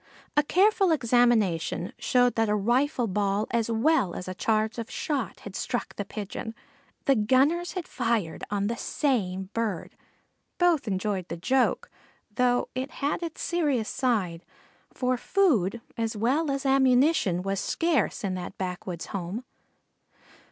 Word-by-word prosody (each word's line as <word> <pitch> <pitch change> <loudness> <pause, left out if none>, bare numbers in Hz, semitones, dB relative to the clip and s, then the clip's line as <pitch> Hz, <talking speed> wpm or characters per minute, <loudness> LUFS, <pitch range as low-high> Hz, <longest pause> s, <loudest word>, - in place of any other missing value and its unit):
A 295 - +6
careful 390 +5 +3
examination 235 - +2
showed 245 -1 +3
that 225 -1 +1
a 210 - +2
rifle 245 +5 +1
ball 205 0 0
as 235 -1 0
well 230 - +2
as 180 - -6
a 185 - -3
charge 220 +3 0
of 230 - -5
shot 280 -6 -3
had 200 -2 -9
struck 245 -2 -3
the 205 - -3
Pigeon. 210 +2 -6 0.5
The 275 - +5
gunners 270 +10 +2
had 365 -3 -4
fired 230 - -1
on 200 -1 -1
the 235 +3 -1
same 190 -11 -1
bird. 220 -7 -3 0.6
Both 345 -7 +3
enjoyed 190 -2 -1
the 170 - -5
joke, 255 +9 +1 0.5
though 245 +1 +2
it 260 +2 -3
had 290 +3 -2
its 330 -2 -5
serious 290 -10 0
side, 195 -10 -1 0.5
for 255 -1 0
food 240 - +2
as 225 -1 -2
well 275 +9 +1
as 275 0 -2
ammunition 265 - +3
was 195 0 -1
scarce 330 - 0
in 195 -2 -1
that 185 +1 -6
backwoods 180 -2 -4
home. 195 +5 -4
230 Hz, 145 wpm, -27 LUFS, 195-270 Hz, 0.6 s, A